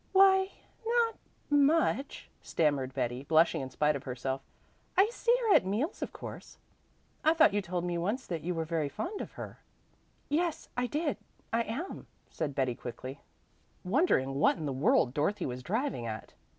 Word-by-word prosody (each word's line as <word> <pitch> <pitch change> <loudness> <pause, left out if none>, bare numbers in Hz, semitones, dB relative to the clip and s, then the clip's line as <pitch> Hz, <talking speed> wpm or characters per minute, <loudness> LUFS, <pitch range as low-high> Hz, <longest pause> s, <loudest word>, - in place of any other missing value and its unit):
"Why 385 0 +6 0.3
no 465 0 +2
t - - -24 0.4
much," 290 -1 +2
stammered 145 -5 +1
Betty, 125 -1 -1
blushing 160 +2 +3
in 130 - -5
spite 150 +3 +2
of 140 - -4
herself. 130 +1 -3 0.6
"I 405 +4 +5
see 480 0 +2
her 445 -4 +4
at - - +6
meals 215 - -1
of - - -3
course." - - -9 0.7
"I 315 +1 +4
thought 320 -9 +6
you 205 - +2
told 175 -2 -3
me 175 -1 -1
once 210 +10 -1
that 170 -3 -3
you 175 +3 -2
were 165 0 -1
very 160 -3 -1
fond 365 - -4
of - - -7
her." - - -8 0.7
"Yes, 330 +2 -1
I 250 0 0
did 300 +2 -1 0.4
I 230 - +3
am," 250 - -5 0.2
said 145 -4 -3
Betty 130 -3 +1
quickly, 130 +3 -7 0.6
wondering 180 - +2
what 140 - +3
in 155 - -4
the 140 - -1
world 130 -1 +3
Dorothy 150 +9 0
was 125 0 -4
driving 215 - -1
at. 110 -1 -6
175 Hz, 175 wpm, -31 LUFS, -, 0.7 s, Why